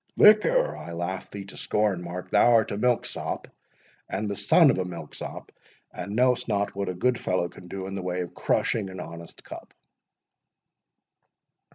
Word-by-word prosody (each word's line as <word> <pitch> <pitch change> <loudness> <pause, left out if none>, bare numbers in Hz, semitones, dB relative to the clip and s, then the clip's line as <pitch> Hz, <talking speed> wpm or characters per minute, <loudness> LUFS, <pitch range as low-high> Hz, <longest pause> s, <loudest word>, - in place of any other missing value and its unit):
"Liquor!—I 215 - +4
laugh 85 +2 -4
thee 100 -1 -7
to 100 - -11
scorn, 105 -4 0
Mark—thou 90 +6 +2
art 110 -2 +3
a 100 - -2
milksop, 125 0 -1 0.6
and 105 +3 -2
the 100 - -2
son - - +5
of - - -2
a - - +1
milksop, 85 -4 -8 0.4
and 100 +1 -5
know'st 125 0 +3
not 100 -2 0
what 100 -1 -3
a 90 - -3
good 125 +6 +1
fellow 90 -1 0
can 90 - -13
do 95 +1 -5
in 95 - -6
the 95 - -3
way 90 0 -2
of 90 - -6
crushing 105 -4 0
an 95 - -8
honest 85 0 -9
cup." - - -11
95 Hz, 165 wpm, -26 LUFS, 90-110 Hz, 0.6 s, son